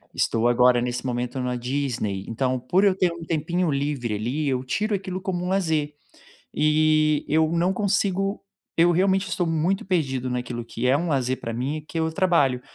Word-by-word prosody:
estou 115 Hz, +1 st, +1 dB
agora 120 Hz, 0 st, +4 dB
nesse 125 Hz, +1 st, -3 dB
momento 125 Hz, +1 st, -2 dB
na 125 Hz, 0 st, -2 dB
Disney, 120 Hz, -6 st, -2 dB
então 130 Hz, +2 st, -1 dB
por 175 Hz, +10 st, +1 dB
eu 190 Hz, -2 st, +4 dB
ter 180 Hz, -2 st, +2 dB
um 170 Hz, 0 st, -8 dB
tempinho 170 Hz, +2 st, -1 dB
livre 140 Hz, -5 st, -1 dB
ali, 130 Hz, +8 st, -2 dB
eu 130 Hz, -2 st, 0 dB
tiro 210 Hz, +11 st, -1 dB
aquilo 190 Hz, -1 st, -5 dB
como 180 Hz, -2 st, -3 dB
lazer. 160 Hz, -6 st, 0 dB, 0.6 s
E 155 Hz, 0 st, +3 dB
eu 160 Hz, +1 st, +2 dB
não 175 Hz, +3 st, +1 dB
consigo 195 Hz, 0 st, 0 dB, 0.4 s
eu 170 Hz, +1 st, +5 dB
realmente 190 Hz, +1 st, +2 dB
estou 175 Hz, 0 st, -1 dB
muito 165 Hz, +5 st, 0 dB
perdido 135 Hz, -9 st, -1 dB
naquilo 125 Hz, -1 st, -4 dB
que 115 Hz, +1 st, -5 dB
é 135 Hz, -, +4 dB
um 170 Hz, +3 st, -2 dB
lazer 130 Hz, -2 st, 0 dB
pra 115 Hz, -, -5 dB
mim, 130 Hz, +6 st, -2 dB
o 150 Hz, -, -15 dB
que 165 Hz, -, -7 dB
é 160 Hz, -, +1 dB
o 160 Hz, -, 0 dB
trabalho. 160 Hz, -8 st, +2 dB
150 Hz, 190 wpm, -24 LUFS, 125-175 Hz, 0.6 s, eu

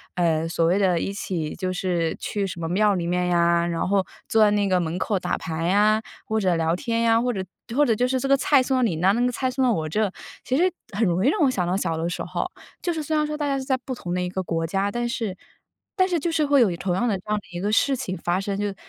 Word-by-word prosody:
呃， 165 Hz, -2 st, +1 dB
所 165 Hz, 0 st, 0 dB
谓 175 Hz, +3 st, +3 dB
的 185 Hz, -4 st, +2 dB
一 195 Hz, -, -2 dB
起 175 Hz, -6 st, -4 dB
就 185 Hz, -1 st, -2 dB
是 175 Hz, -3 st, -1 dB
去 205 Hz, -2 st, -2 dB
什 180 Hz, -3 st, -6 dB
么 165 Hz, -, -3 dB
庙 205 Hz, +3 st, +3 dB
里 170 Hz, -2 st, -2 dB
面 180 Hz, +1 st, 0 dB
呀， 170 Hz, -1 st, +3 dB
然 170 Hz, 0 st, -1 dB
后 195 Hz, -1 st, +2 dB, 0.2 s
坐 220 Hz, -1 st, +5 dB
在 210 Hz, -, +5 dB
那 205 Hz, -1 st, +2 dB
个 185 Hz, -1 st, +3 dB
门 170 Hz, 0 st, -2 dB
口 205 Hz, -, 0 dB
打 -, -, -2 dB
牌 165 Hz, 0 st, -4 dB
呀， 210 Hz, +3 st, +3 dB, 0.2 s
或 220 Hz, 0 st, 0 dB
者 185 Hz, -4 st, +2 dB
聊 165 Hz, 0 st, +1 dB
天 230 Hz, +3 st, -1 dB
呀， 230 Hz, 0 st, +4 dB
或 245 Hz, 0 st, 0 dB
者 190 Hz, -3 st, -3 dB, 0.3 s
或 295 Hz, +2 st, +4 dB
者 230 Hz, -5 st, +2 dB
就 250 Hz, +3 st, +1 dB
是 260 Hz, 0 st, 0 dB
这 270 Hz, -, -2 dB
个 275 Hz, -, +5 dB
菜 280 Hz, 0 st, +4 dB
送 260 Hz, +1 st, 0 dB
到 255 Hz, -, +2 dB
你 190 Hz, -9 st, +1 dB
那， 185 Hz, +4 st, +4 dB
那 235 Hz, -, 0 dB
个 250 Hz, 0 st, +2 dB
菜 260 Hz, +2 st, -1 dB
送 265 Hz, +1 st, 0 dB
到 250 Hz, -2 st, +3 dB
我 160 Hz, -5 st, -2 dB
这， 210 Hz, +5 st, +1 dB, 0.3 s
其 255 Hz, -, -1 dB
实 360 Hz, +6 st, +3 dB, 0.2 s
很 220 Hz, +2 st, +2 dB
容 180 Hz, +4 st, +1 dB
易 -, -, +6 dB
让 400 Hz, -, 0 dB
我 285 Hz, -, +5 dB
想 190 Hz, -8 st, -1 dB
到 180 Hz, -, 0 dB
小 170 Hz, -4 st, -1 dB
的 165 Hz, +1 st, -1 dB
时 175 Hz, -, -4 dB
候。 -, -, -3 dB, 0.3 s
就 350 Hz, -, 0 dB
是 320 Hz, -, -3 dB
虽 310 Hz, +1 st, 0 dB
然 300 Hz, -, +2 dB
说 300 Hz, 0 st, -3 dB
大 295 Hz, -, -2 dB
家 275 Hz, -1 st, 0 dB
是 265 Hz, -, -3 dB
在 265 Hz, -, +2 dB
不 260 Hz, +1 st, -6 dB
同 175 Hz, -7 st, -5 dB
的 180 Hz, -, 0 dB
一 180 Hz, -, -2 dB
个 190 Hz, +1 st, -3 dB
国 165 Hz, -2 st, -1 dB
家， 195 Hz, +4 st, 0 dB
但 240 Hz, +2 st, -2 dB
是 220 Hz, -6 st, -3 dB, 0.6 s
但 370 Hz, -2 st, +3 dB
是 350 Hz, -3 st, 0 dB
就 335 Hz, +3 st, -1 dB
是 315 Hz, -2 st, +1 dB
会 285 Hz, -2 st, +4 dB
有 195 Hz, -7 st, +3 dB
同 180 Hz, 0 st, -1 dB
样 240 Hz, +6 st, +1 dB
的 205 Hz, -4 st, +1 dB
这 -, -, -18 dB
样 210 Hz, -, +1 dB
的 175 Hz, -3 st, -15 dB
一 -, -, -3 dB
个 205 Hz, +2 st, 0 dB
事 270 Hz, +5 st, +3 dB
情 190 Hz, -8 st, -4 dB
发 175 Hz, +2 st, -1 dB
生， 195 Hz, 0 st, -3 dB
就 205 Hz, -, -1 dB
是 200 Hz, -, -5 dB
200 Hz, 325 characters per minute, -24 LUFS, 175-250 Hz, 0.6 s, 易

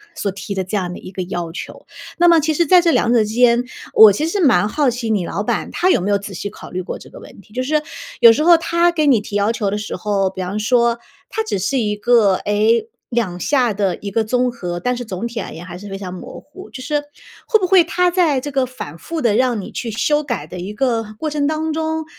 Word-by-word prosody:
所 200 Hz, -, -2 dB
提 200 Hz, +1 st, -6 dB
的 190 Hz, -, -1 dB
这 185 Hz, +3 st, -3 dB
样 180 Hz, -2 st, -3 dB
的 -, -, -8 dB
一 185 Hz, -, -10 dB
个 185 Hz, -1 st, -4 dB
要 175 Hz, -2 st, -4 dB
求？ 175 Hz, -, -9 dB, 0.3 s
那 345 Hz, -, +4 dB
么 335 Hz, -1 st, +6 dB
其 315 Hz, +1 st, 0 dB
实 340 Hz, +3 st, +2 dB
在 360 Hz, +4 st, +6 dB
这 340 Hz, -, +2 dB
两 235 Hz, -6 st, +2 dB
者 240 Hz, -, +5 dB
之 -, -, -4 dB
间， 240 Hz, 0 st, +4 dB, 0.3 s
我 220 Hz, -2 st, +9 dB
其 300 Hz, -, -1 dB
实 400 Hz, +5 st, -2 dB
蛮 255 Hz, -, +4 dB
好 290 Hz, +2 st, +1 dB
奇 240 Hz, -1 st, -4 dB
你 205 Hz, -5 st, 0 dB
老 -, -, -3 dB
板， -, -, -2 dB
他 365 Hz, -, +1 dB
有 -, -, +4 dB
没 190 Hz, -, -2 dB
有 200 Hz, -, +3 dB
仔 200 Hz, 0 st, -8 dB
细 205 Hz, +3 st, -5 dB
考 -, -, -12 dB
虑 185 Hz, +1 st, -3 dB
过 -, -, -6 dB
这 -, -, -14 dB
个 -, -, -12 dB
问 -, -, -14 dB
题？ 210 Hz, -, -22 dB
就 255 Hz, +2 st, -2 dB
是 300 Hz, +3 st, +1 dB, 0.4 s
有 235 Hz, -1 st, +10 dB
时 300 Hz, +7 st, +1 dB
候 340 Hz, 0 st, +7 dB
他 340 Hz, +1 st, +2 dB
给 315 Hz, -3 st, 0 dB
你 255 Hz, -6 st, +5 dB
提 205 Hz, 0 st, -8 dB
要 205 Hz, +2 st, +2 dB
求 215 Hz, -3 st, -1 dB
的 205 Hz, -, -2 dB
时 210 Hz, 0 st, -5 dB
候， 195 Hz, 0 st, 0 dB
比 185 Hz, 0 st, -7 dB
方 185 Hz, +3 st, -3 dB
说 235 Hz, +1 st, +2 dB, 0.3 s
他 445 Hz, -, -2 dB
只 435 Hz, -, -2 dB
是 200 Hz, +9 st, -1 dB
一 210 Hz, -3 st, -1 dB
个， 210 Hz, -2 st, +3 dB
诶， 215 Hz, -, +1 dB, 0.2 s
两 220 Hz, -8 st, -2 dB
下 250 Hz, -1 st, +1 dB
的 195 Hz, -2 st, 0 dB
一 200 Hz, -1 st, -7 dB
个 225 Hz, +2 st, +1 dB
综 250 Hz, +3 st, 0 dB
合， 180 Hz, -7 st, -5 dB
但 250 Hz, +6 st, -1 dB
是 245 Hz, -, -5 dB
总 195 Hz, +2 st, -4 dB
体 235 Hz, -1 st, -5 dB
而 195 Hz, -, -6 dB
言 165 Hz, +2 st, -9 dB
还 175 Hz, -1 st, -8 dB
是 205 Hz, +2 st, -10 dB
非 195 Hz, -, -5 dB
常 185 Hz, -2 st, -7 dB
模 185 Hz, -, -9 dB
糊。 380 Hz, +7 st, -13 dB
就 255 Hz, -, -9 dB
是， 295 Hz, +2 st, -1 dB, 0.5 s
会 440 Hz, -, +4 dB
不 375 Hz, -, 0 dB
会 375 Hz, -2 st, +6 dB
他 355 Hz, +2 st, +1 dB
在 335 Hz, -7 st, +2 dB
这 290 Hz, +3 st, -6 dB
个 270 Hz, -1 st, +1 dB
反 245 Hz, -, -9 dB
复 325 Hz, -, -5 dB
地 230 Hz, -4 st, +2 dB
让 250 Hz, -2 st, +1 dB
你 195 Hz, -, -7 dB
去 235 Hz, -, -4 dB
修 295 Hz, +7 st, +1 dB
改 245 Hz, -5 st, -4 dB
的 180 Hz, -, -8 dB
一 190 Hz, +4 st, -6 dB
个 225 Hz, -3 st, -1 dB
过 315 Hz, -, -3 dB
程 290 Hz, -1 st, -1 dB
当 310 Hz, +1 st, -1 dB
中， 320 Hz, 0 st, -2 dB
235 Hz, 290 characters per minute, -19 LUFS, 200-300 Hz, 0.5 s, 有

